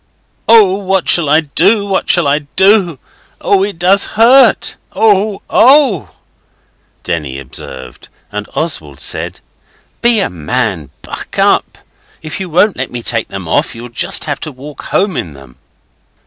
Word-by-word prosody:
'Oh, 220 -4 +6
what 190 -2 -1
shall 165 -5 +3
I 155 +2 +4
do? 190 +8 +1
What 195 -1 -2
shall 175 -3 +3
I 145 +1 +2 0.2
do? 190 -5 +3 0.4
Oh, 195 -1 +1
it 200 -3 -4
does 185 +4 +3
hurt! 245 +2 +4 0.2
Oh, 210 -2 +1
oh!' 260 - +3 0.9
Denny 70 -5 -4
observed, 65 -1 -10 0.2
and 105 0 -6
Oswald 80 - -2
said 70 - -2 0.6
'Be 235 -2 +3
a 195 - 0
man! 80 -4 -3
Buck - - -8
up! - - +1 0.5
If 155 +3 -6
you 190 -2 -5
won't 180 +5 +2
let 130 0 -4
me 120 -1 -7
take 115 -1 -1
them 95 -3 -8
off 115 +8 0
you'll 120 +1 -9
just 115 - 0
have 145 -2 -3
to 155 - -6
walk 140 +3 -11
home 195 -3 0
in 80 - -4
them. 70 -3 -16
165 Hz, 150 wpm, -13 LUFS, -, 0.9 s, Oh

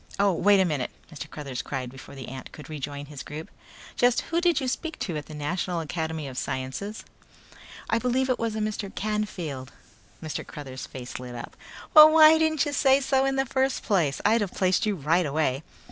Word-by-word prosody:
"Oh, 200 -1 +4
wait 200 +3 +4
a 190 - +4
minute," 145 -7 -1 0.2
Mr. 145 - -7
Cruthers 135 -5 -5
cried 130 -2 -4
before 135 +1 -12
the 135 -2 -8
ant 130 0 -8
could 150 -1 -11
rejoin 145 -1 -5
his 145 -1 -9
group. 155 +2 -8 0.4
"Just 245 0 +3
who 335 +1 -1
did 350 -1 +3
you 265 - -2
speak 320 +5 -3
to 175 - -3
at 150 - -5
the 155 - -9
National 170 +4 -2
Academy 160 -1 -3
of 130 -1 -4
Sciences?" 130 +12 -4 0.8
"I 225 - +1
believe 250 +2 +1
it 255 - 0
was 230 -1 -1
a - - -2
Mr. 210 -1 -2
Canfield." 180 -11 -3 0.5
Mr. 155 -1 -4
Cruthers' 135 -3 -8
face 125 -2 -7
lit 125 -1 -8
up. 120 - -8 0.4
"Well, 310 -1 +11
why 315 0 +8
didn't 315 -1 +2
you 290 - -3
say 270 -1 +4
so 270 -1 +2
in 270 0 +1
the 270 0 +1
first 265 +1 0
place! 170 -10 +1
I'd 220 +2 +4
have 200 -3 -2
placed 185 +3 +2
you 210 - +1
right 165 +2 +1
away." 140 -2 0
175 Hz, 205 wpm, -26 LUFS, -, 0.8 s, Well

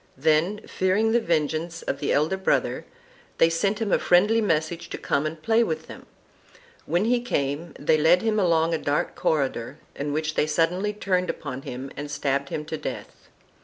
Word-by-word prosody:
Then, 160 +8 +2
fearing 195 +4 +1
the 235 - +4
vengeance 165 -2 -1
of - - -3
the 145 - -1
elder 155 +6 +2
brother, 190 0 0 0.5
they 165 - +4
sent 195 +5 0
him 220 -4 -1
a - - +4
friendly 210 +6 +4
message 165 -3 -1
to - - -5
come 140 +2 0
and 155 +1 -6
play 225 +8 +3
with 465 - -3
them; - - -12 0.8
when 175 +5 +1
he 240 +1 +2
came 150 - -2
they 155 +2 +2
led 165 +5 +4
him 220 -1 +1
along 165 -3 +2
a 160 - 0
dark 145 0 -1
corridor 135 -3 -1 0.2
in 145 +1 -3
which 155 +1 -1
they 150 - +1
suddenly 175 +6 +1
turned 185 -3 -1
upon 130 -3 -5
him 130 +1 -7
and 145 +1 -6
stabbed 140 -1 -1
him 150 - -4
to 160 - -4
death. - - -8
165 Hz, 185 wpm, -25 LUFS, 150-190 Hz, 0.8 s, the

